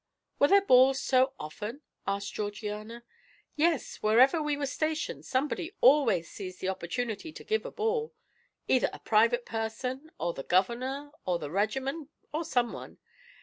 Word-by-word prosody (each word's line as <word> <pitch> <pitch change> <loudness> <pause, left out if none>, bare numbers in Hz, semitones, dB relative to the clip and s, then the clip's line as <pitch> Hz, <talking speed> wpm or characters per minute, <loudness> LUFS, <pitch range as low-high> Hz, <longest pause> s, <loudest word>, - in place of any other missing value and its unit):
"Were 285 - +6
there 400 +3 +5
balls 260 -2 +6
so 260 0 +3
often?" 210 - -6 0.3
asked 200 0 -2
Georgiana. 210 +2 -5 0.5
"Yes; 320 -1 +1
wherever 255 +9 +4
we 300 -1 -1
were 285 - -1
stationed 310 +3 -2
somebody 295 +7 -1
always 240 - +5
seized 185 -3 -8
the 190 - -2
opportunity 205 - -3
to - - -11
give 440 +3 -1
a - - -5
ball, 450 +1 -1 0.5
either 255 - +3
a - - -7
private 230 +3 +2
person, 250 +6 -4
or 170 +1 -1
the 135 - -6
Governor, 255 - 0
or 180 -2 0
the 145 -3 -6
regiment, 265 - -1 0.2
or 315 +3 -1
someone. 245 -6 -2
250 Hz, 145 wpm, -29 LUFS, 210-290 Hz, 0.5 s, Were